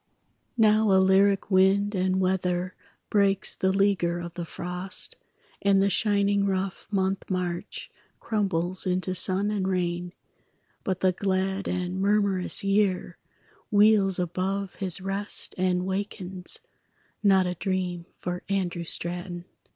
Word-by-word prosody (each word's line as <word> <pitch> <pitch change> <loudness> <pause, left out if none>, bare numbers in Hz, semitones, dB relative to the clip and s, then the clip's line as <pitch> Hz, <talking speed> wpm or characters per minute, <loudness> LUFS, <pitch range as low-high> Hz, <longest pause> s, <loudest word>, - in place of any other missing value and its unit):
Now 215 -1 +4
a 190 - +5
lyric 195 +1 +3
wind 195 +2 +3
and 185 -1 +1
weather 185 -1 0 0.4
Breaks 200 -2 +2
the 190 - +1
leaguer 190 -3 +1
of 170 -1 -7
the 175 -1 -5
frost, 180 +3 -5 0.5
And 200 -1 +4
the 200 +1 +2
shining 200 -1 +2
rough 190 0 -3
month 195 -1 -1
March 180 -2 -4 0.3
Crumbles 185 -4 -1
into 185 0 0
sun 190 +3 +3
and 195 -3 -1
rain; 175 -1 -2 0.7
But 185 -1 -2
the 185 - +4
glad 190 +1 -1
and 180 0 -2
murmurous 200 -2 +2
year 195 -3 0 0.5
Wheels 205 -3 +4
above 185 +2 -2
his 190 -1 0
rest 195 +2 -3
and 180 -1 0
wakens 190 -1 -2 0.6
Not 195 -2 +4
a 180 - -1
dream 180 -1 -3
for 180 0 -4
Andrew 180 -3 -1
Straton. 175 +1 -4
190 Hz, 125 wpm, -26 LUFS, 180-200 Hz, 0.7 s, a